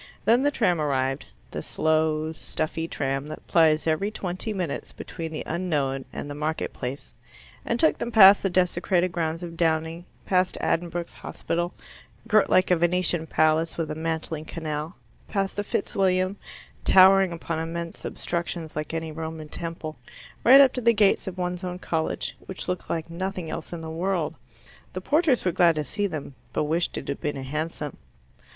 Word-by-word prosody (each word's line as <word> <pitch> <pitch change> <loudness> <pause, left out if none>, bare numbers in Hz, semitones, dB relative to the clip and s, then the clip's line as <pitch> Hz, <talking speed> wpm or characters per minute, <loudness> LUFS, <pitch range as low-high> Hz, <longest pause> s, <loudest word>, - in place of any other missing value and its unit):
Then 235 +3 +5
the 290 - +3
tram 180 - +1
arrived 135 -2 0 0.2
the - - -4
slow 155 0 +1
stuffy 160 0 -3
tram 135 -2 -2
that 155 - -8
plies 160 -2 +4
every 165 +6 +1
twenty 190 +1 -3
minutes 180 -8 -3
between 165 -2 -7
the 155 - -4
unknown 145 -6 -1
and - - -6
the 145 - -5
marketplace 145 -3 -4 0.5
and 235 - -1
took 315 - +3
them 240 - -3
past 200 -2 +9
the 195 - +1
desecrated 180 0 +1
grounds 165 -1 -2
of 170 -1 -6
Downing, 165 +1 0 0.2
past 185 -1 +1
Addenbrookes 170 0 -1
Hospital, 175 +2 -3 0.5
girt 215 -2 +4
like 185 0 +4
a 180 - +5
Venetian 175 -1 +1
palace 155 +1 +2
with 165 -2 -2
a - - -1
mantling 160 0 -3
canal, 155 0 -4 0.3
past 195 -2 -1
the 205 - -1
Fitz 200 - -3
William, 185 0 +2 0.5
towering 190 0 +7
upon 165 -1 -3
immense 165 +1 -4
substructions 170 -2 -4
like 155 +2 -3
any 160 -1 -3
Roman 160 0 -6
temple, 165 -3 -6 0.5
right 265 +3 +9
up 265 -2 +6
to 250 - -3
the 235 0 +5
gates 205 -3 +3
of 190 -1 -5
one's 180 0 -3
own 180 -1 -3
college, 160 -3 -2
which 190 - -6
looked 180 0 -3
like 165 0 -3
nothing 185 -1 -4
else - - -5
in 170 -2 -5
the 160 0 -6
world. 170 -1 -1 0.6
The 185 - -4
porters 295 - +2
were 180 - +3
glad 170 -1 +4
to 150 -1 -2
see 205 +4 -1
them, 155 -6 -6 0.2
but - - +1
wished 165 +3 0
it - - -6
had 140 - -4
been 150 -1 -2
a 135 - -5
hansom. 150 +1 -4
165 Hz, 175 wpm, -25 LUFS, 155-185 Hz, 0.6 s, past